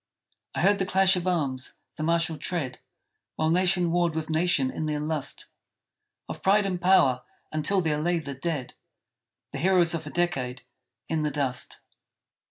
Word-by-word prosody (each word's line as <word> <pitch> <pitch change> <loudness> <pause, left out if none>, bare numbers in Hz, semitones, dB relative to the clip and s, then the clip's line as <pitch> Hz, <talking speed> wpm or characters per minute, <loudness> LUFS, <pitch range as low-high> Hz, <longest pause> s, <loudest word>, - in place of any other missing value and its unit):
I - - 0
heard 200 +3 +4
the 190 - +1
clash 190 0 +4
of 180 0 -2
arms; 140 -7 -1 0.2
the - - -7
martial 165 0 +1
tread; 145 -4 -3 0.6
While 155 0 +1
nation 180 -1 +2
warred 175 -2 +1
with 160 0 -3
nation 155 -5 +2
in 155 - -3
their 150 -1 -1
lust 150 -2 -3 0.8
Of - - -7
pride 200 +2 +4
and 180 -2 -2
power, 140 -9 +4 0.3
until 170 +5 +1
there 150 -3 0
lay 175 +2 +1
the 145 -4 -5
dead 140 -2 -3 0.8
The - - -5
heroes 180 -2 +4
of 160 -2 -4
a - - -4
decade 135 -8 -1 0.4
in 160 -1 0
the 150 - +1
dust! 135 -3 -3
160 Hz, 165 wpm, -27 LUFS, 150-180 Hz, 0.8 s, heard